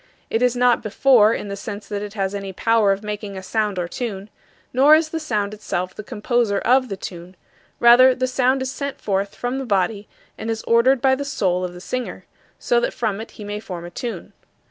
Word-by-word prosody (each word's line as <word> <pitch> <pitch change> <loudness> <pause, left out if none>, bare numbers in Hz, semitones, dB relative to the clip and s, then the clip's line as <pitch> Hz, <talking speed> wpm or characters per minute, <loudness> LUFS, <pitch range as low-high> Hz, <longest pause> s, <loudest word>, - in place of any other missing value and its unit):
It 225 - +1
is 250 -1 +3
not 245 -1 +3
"before" 220 0 +4
in 210 - -3
the 200 - -4
sense 200 +1 -7
that 205 -1 -4
it 205 0 -7
has 195 -1 -1
any 195 -1 -5
power 225 0 +3
of 195 +2 -2
making 210 -1 -5
a 190 - -7
sound 210 -1 -1
or 175 -1 -1
tune. 205 0 -5 0.4
Nor 280 +4 +7
is 315 0 +1
the 325 - -3
sound 210 -9 -2
itself 185 -3 -3
the 215 - -8
composer 210 0 0
of 255 +4 +2
the 195 - -4
tune; 180 0 -9 0.4
rather, 250 +2 +7
the 255 - 0
sound 255 +1 +1
is 260 - -3
sent 280 0 -5
forth 195 0 -2
from 245 +2 -3
the - - -3
body 205 -2 0 0.3
and 220 - -4
is 225 -1 -3
ordered 240 +3 +3
by 265 -1 +5
the 275 +2 -1
soul 185 -10 0
of 180 -1 -4
the 180 - -10
singer, 255 +5 -5 0.3
so - - +1
that - - -2
from 215 -3 -2
it 225 - -9
he 210 - -8
may 205 0 -4
form 180 -5 -7
a 175 - -9
tune. 215 -2 -6
220 Hz, 225 wpm, -21 LUFS, 200-255 Hz, 0.4 s, Nor